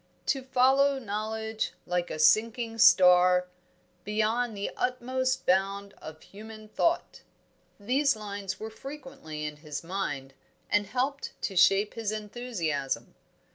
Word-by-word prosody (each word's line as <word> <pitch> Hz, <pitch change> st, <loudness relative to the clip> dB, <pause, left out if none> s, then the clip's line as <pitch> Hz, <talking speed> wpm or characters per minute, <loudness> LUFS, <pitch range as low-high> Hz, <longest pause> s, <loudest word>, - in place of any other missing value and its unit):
"To 270 Hz, -, 0 dB
follow 265 Hz, +2 st, +3 dB
Knowledge 220 Hz, -1 st, -3 dB
like 180 Hz, 0 st, -1 dB
a -, -, -4 dB
sinking 225 Hz, +7 st, +2 dB
star 180 Hz, -2 st, +6 dB, 0.5 s
Beyond 220 Hz, +2 st, 0 dB
the 200 Hz, -, -3 dB
utmost 255 Hz, +1 st, -1 dB
bound 195 Hz, +2 st, +1 dB
of 155 Hz, 0 st, -10 dB
human 215 Hz, +1 st, -12 dB
thought 335 Hz, +9 st, 0 dB, 0.3 s
" -, -, -40 dB, 0.3 s
these 265 Hz, +6 st, +2 dB
lines 200 Hz, -2 st, -6 dB
were 220 Hz, +1 st, -6 dB
frequently 265 Hz, -, -8 dB
in 150 Hz, 0 st, -5 dB
his 150 Hz, -1 st, -7 dB
mind, 145 Hz, -7 st, -4 dB, 0.4 s
and 205 Hz, -1 st, +2 dB
helped 260 Hz, +6 st, -3 dB
to 195 Hz, -, -2 dB
shape 195 Hz, +3 st, +4 dB
his 225 Hz, -2 st, -3 dB
enthusiasm. 210 Hz, -, -3 dB
215 Hz, 125 wpm, -28 LUFS, 185-250 Hz, 0.5 s, star